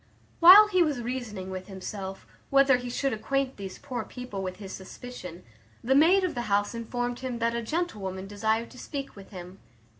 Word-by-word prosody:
While 380 +5 +10
he 370 -3 +3
was 300 -6 +1
reasoning 230 -6 -5
with 185 0 -6
himself, 195 0 -7 0.2
whether 275 -1 +5
he 245 0 -6
should 270 +2 -1
acquaint 270 +4 -1
these 195 -2 -7
poor 260 -4 -5
people 250 -6 -7
with 185 -1 -4
his 195 -2 -9
suspicion, 190 -3 -9 0.4
the 260 - +2
maid 340 +7 +5
of 365 - 0
the 240 -3 -4
house 205 +2 +1
informed 245 +1 -3
him 255 -2 -4
that 230 0 0
a 235 - -1
gentlewoman 210 - -3
desired 220 +3 -1
to 255 - -13
speak 275 -2 -6
with 195 -1 -12
him. 180 0 -10
235 Hz, 185 wpm, -27 LUFS, 195-270 Hz, 0.4 s, While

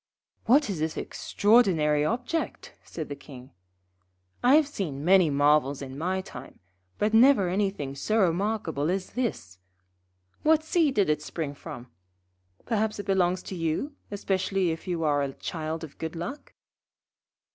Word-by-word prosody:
'What 275 +4 +5
is 195 -6 -3
that 160 +1 -2
extraordinary 175 -10 +2
object?' 250 - -3
said 160 -3 -6
the 145 - -6
King. 130 -2 -13 0.9
'I 255 +3 +6
have 310 -2 +4
seen 155 - -4
many 185 -2 +5
marvels 145 -1 +3
in 135 -1 -8
my 185 +6 -1
time, 130 -8 -11 0.4
but 210 +1 0
never 225 -5 +6
anything 190 -7 -1
so 215 +10 -1
remarkable 180 -5 0
as 185 +1 -2
this. 155 - -4 0.8
What 315 0 +3
seed 315 -4 +1
did 200 - +3
it 150 0 +1
spring 150 -1 -4
from? 140 -4 -10 0.7
Perhaps 220 -1 0
it 205 - -6
belongs 185 -2 +1
to 190 - -7
you, 165 - -2 0.2
especially 195 -2 0
if 160 +2 -7
you 170 -2 -2
are 145 -2 +2
a 140 -1 -2
child 160 +1 -5
of 155 - -10
good 160 +1 -5
luck?' 175 - -7
180 Hz, 145 wpm, -27 LUFS, 150-215 Hz, 0.9 s, I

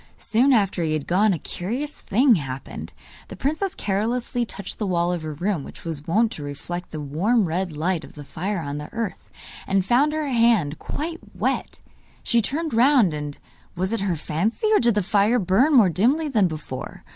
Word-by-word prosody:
Soon 250 +5 +2
after 200 -7 +2
he 155 -1 0
had 155 -2 -2
gone 200 +4 +3
a 180 - 0
curious 245 - -4
thing 245 +5 +3
happened. 135 -7 -4 0.4
The - - -9
princess 315 +7 -1
carelessly 230 +4 -1
touched 200 -3 -7
the 210 - -1
wall 175 -1 +1
of 175 - -3
her 155 -1 -5
room, 175 -1 -1
which - - -12
was 160 -2 -4
wont 220 +6 +2
to 150 - -7
reflect 160 +5 -6
the 155 - -6
warm 185 - +1
red 170 -1 -2
light 170 +1 0
of - - -12
the 145 - -9
fire 190 +7 -3
on 145 -1 -4
the 150 - -6
hearth, 225 -4 -5 0.4
and 195 -1 +1
found 265 +7 +3
her 310 -1 -1
hand 230 - +3
quite 330 +2 -4 0.2
wet. - - -2 0.4
She 235 -1 +3
turned 310 +6 -3
round, 240 - +5
and 150 -1 -5 0.4
was 185 +4 -1
it 230 - 0
her 195 -3 0
fancy? 170 - -2
or - - +6
did 235 -2 +3
the 210 - +2
fire 205 +5 +3
burn 210 - +3
more 225 -7 +7
dimly 255 - +2
than 215 -9 +3
before? 150 -5 -7
195 Hz, 195 wpm, -23 LUFS, 165-240 Hz, 0.4 s, more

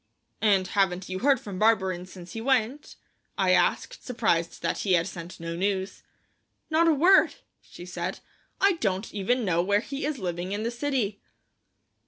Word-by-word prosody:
"And 200 -4 +3
haven't 190 -2 0
you 185 0 -3
heard 275 +2 +3
from 195 -4 -7
Barberin 190 -5 +2
since 180 -2 -11
he 225 - -5
went?" 260 +3 0 0.4
I - - +3
asked, - - +1
surprised 215 -9 -1
that - - -1
he 195 - +1
had 170 -1 +3
sent 175 -1 -8
no 165 0 -5
news. 190 +1 -2 0.7
"Not 330 +2 +4
a 325 - +5
word," 355 +7 +5 0.3
she 175 - -12
said. 180 +1 -4 0.4
"I 395 - +5
don't 195 - -2
even 225 +4 0
know 170 -3 +2
where 200 +3 +2
he 275 +3 -6
is 300 -2 -2
living 180 -2 -3
in 210 +1 -2
the 230 - -1
city." 240 -5 -2
200 Hz, 170 wpm, -27 LUFS, 180-245 Hz, 0.7 s, a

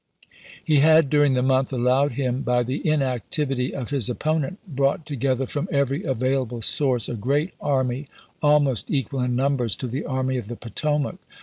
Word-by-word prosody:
He 155 - +3
had, 155 -1 +5
dur 145 -1 +5
ing 140 -2 +3
the 125 -1 +1
month 130 +1 +2
allowed 130 +2 +2
him 130 0 -1
by 125 -1 +1
the 130 +4 -3
inactivity 135 -1 0
of 130 -2 -5
his 135 -4 +1
opponent, 155 +7 -1
brought 140 0 0
together 135 -2 -1
from 145 +7 -4
every 140 +1 +1
available 130 -2 -1
source 125 -2 +1
a - - -4
great 140 - -1
army, 130 0 0 0.3
almost 145 -5 +2
equal 135 -2 -1
in 125 0 0
numbers 130 -4 +1
to - - -6
the 130 +5 -4
Army 130 -2 -1
of 120 -5 -5
the 120 - -5
Potomac. 150 - -2
135 Hz, 175 wpm, -23 LUFS, 125-145 Hz, 0.3 s, had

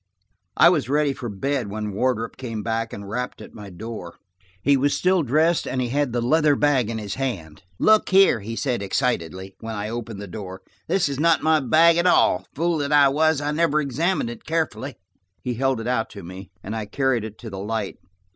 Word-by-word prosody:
I - - +8
was 120 - 0
ready 145 0 +2
for 120 -3 -6
bed 125 +3 -2
when 105 0 -4
Wardrop 115 +1 -1
came 115 -5 -5
back 115 0 -2
and 100 0 -8
rapped 125 +5 -4
at - - -11
my 105 -2 -10
door. 95 -2 -8 0.5
He 140 - +4
was 140 +2 +1
still 185 0 +2
dressed, 155 +5 +2
and 130 - -2
he 125 -1 -1
had 140 0 0
the 120 0 -1
leather 150 +3 +3
bag 135 -6 +2
in 115 - -3
his 105 -2 -5
hand. 85 - -4 0.2
"Look 215 - +4
here," 190 -10 +5
he 110 +3 -6
said 125 -3 -1
excitedly, 95 - -2
when 110 0 -6
I 105 +1 -4
had 120 -1 -4
closed 110 -3 -8
the 100 - -7
door, 95 -1 -8 0.2
"this 180 0 +2
is 140 -1 -4
not 165 +1 +3
my 160 0 +4
bag 160 +5 +4
at 170 +1 +2
all. - - +3
Fool 165 0 0
that 145 0 -2
I 145 -2 +6
was. 155 +1 +2
I 145 0 -1
never 155 -1 +2
examined 150 -1 -1
it 120 - -11
carefully." 155 -5 -2 0.5
He 125 - -2
held 130 0 0
it 115 - -6
out 125 -3 0
to 100 - -9
me, 95 +2 -9
and 105 +3 -5
I 110 -2 -4
carried 130 0 0
it 110 -1 -8
to 115 -2 -9
the 95 - -6
light. 105 0 -3
125 Hz, 220 wpm, -23 LUFS, 110-145 Hz, 0.5 s, I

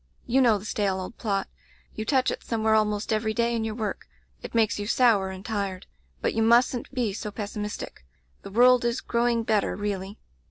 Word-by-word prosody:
You 260 +3 +3
know 230 -4 +5
the 200 - -10
stale 200 -3 -1
old 185 +5 -7
plot. 200 -4 -1 0.5
You 220 - -5
touch 260 +1 +2
it - - -6
somewhere 220 -1 +1
almost 210 0 +1
every 220 0 -1
day 235 0 +1
in 225 - -1
your 220 -1 -3
work. 220 -3 -4 0.3
It - - -8
makes 220 -2 +2
you 205 - -3
sour 225 -6 +3
and 190 +1 -8
tired. 200 -4 -3 0.4
But - - 0
you 225 - 0
mustn't 235 +2 +3
be 245 -6 -1
so 210 +1 -5
pessimis 210 0 -5
tic. - - -9 0.4
The - - -9
world 245 +4 +5
is 235 +1 0
growing 235 -1 0
better, 215 -2 +1
really. 200 0 -4
220 Hz, 200 wpm, -26 LUFS, 205-235 Hz, 0.5 s, know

